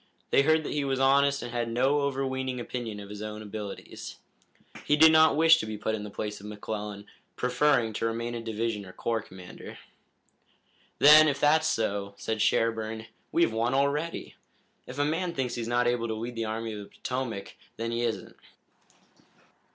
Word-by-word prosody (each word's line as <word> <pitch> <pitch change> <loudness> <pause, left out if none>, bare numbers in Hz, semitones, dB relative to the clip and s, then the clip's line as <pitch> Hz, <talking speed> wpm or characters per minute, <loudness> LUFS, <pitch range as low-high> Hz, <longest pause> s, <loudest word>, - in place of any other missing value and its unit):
They - - +6
heard 160 +2 +3
that - - -4
he 145 - 0
was 135 -1 -1
honest 140 +1 +3
and 120 - -6
had 120 -1 -2
no 130 +5 +2
overweening 130 -2 -2
opinion 120 -3 -5
of 100 0 -9
his 105 0 -7
own 105 0 -6
abilities. 105 -1 -7 0.7
He 150 - +3
did 160 +1 +8
not 160 -2 +6
wish 165 +1 +6
to - - -4
be 110 -1 -5
put 110 +1 -2
in 105 -1 -3
the 105 - -6
place 105 +1 -5
of 100 - -10
McClellan, 105 -1 -6 0.3
preferring 125 -2 +2
to 115 - -1
remain 115 +1 -3
a 120 - -4
division 115 -1 -2
or 95 -1 -12
corps 115 -1 -1
commander. 90 -2 -11 1.2
"Then, 155 +2 +8
if 145 -1 0
that's 155 +2 +4
so," 100 -7 -1
said 110 -1 -3
Sherburne, 110 0 0 0.3
"we've 170 -9 +2
won 115 +3 0
already. 145 +4 -1 0.5
If 125 - -8
a 145 - +2
man 170 +3 -1
thinks 130 -3 -1
he's 115 -2 -3
not 120 +1 +1
able 120 -1 +1
to 110 - -2
lead 115 +3 -5
the 115 -1 -3
Army 110 +1 -3
of 105 - -6
the 100 - -12
Potomac, 125 -6 -4 0.2
then 115 +1 -3
he 115 0 -1
isn't. 110 -6 -3
120 Hz, 185 wpm, -28 LUFS, 110-140 Hz, 1.2 s, did